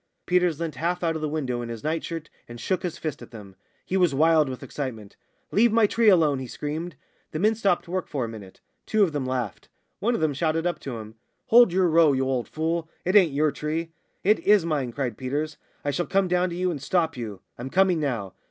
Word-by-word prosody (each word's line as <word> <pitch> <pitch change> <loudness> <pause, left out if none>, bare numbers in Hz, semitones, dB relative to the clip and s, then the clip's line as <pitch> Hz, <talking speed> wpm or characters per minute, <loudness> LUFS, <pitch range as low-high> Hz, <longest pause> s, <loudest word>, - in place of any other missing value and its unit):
Peters 180 -3 +2
leant 160 -5 -4
half 175 +4 -1
out 165 -1 +1
of 160 - -4
the 155 - -1
window 130 -6 -2
in 120 - -6
his 115 -2 -7
night 160 +1 -1
shirt 165 -2 -5 0.2
and 120 0 -9
shook 185 +10 -1
his 180 -3 -4
fist 155 -4 -5
at 120 - -10
them. 105 -5 -11 0.3
He 190 - -1
was 175 -7 +3
wild 155 -1 +4
with 130 - -6
excitement. 115 -8 -6 0.4
"Leave 230 +3 +4
my 225 0 +5
tree 225 +1 +4
alone!" 155 -8 +4
he 130 - -5
screamed. 155 +6 -5 0.4
The - - -2
men 215 +7 +3
stopped 200 -6 0
work 185 +1 -3
for 135 -4 -2
a - - -5
minute. 105 -4 -11 0.3
Two 215 -1 +3
of 180 - +2
them 145 -3 -2
laughed. 125 -5 -3 0.3
One 235 +3 +1
of - - -1
them 155 -2 +1
shouted 160 +3 0
up 175 - -1
to 130 -4 -6
him: 110 0 -9 0.4
"Hold 235 -4 +7
your 185 0 +3
row, 160 -3 +5
you 130 0 +1
old 130 -3 -1
fool! 160 +1 -2 0.2
It 185 +3 +1
ain't 185 -7 +6
your 150 +2 +2
tree." 160 +3 -3 0.3
"It 210 +3 +4
is 205 -4 +4
mine," 145 -7 -1
cried 125 -3 -3
Peters. 145 +4 -3 0.3
"I 145 - +1
shall 175 +4 -2
come 195 -1 +2
down 180 +1 +1
to 170 - -5
you 180 0 0
and 145 -5 -5
stop 165 +2 +1
you. 110 -6 -6 0.2
I'm 125 +2 -5
coming 185 +1 +3
now." 115 - -2
155 Hz, 235 wpm, -25 LUFS, 130-180 Hz, 0.4 s, Hold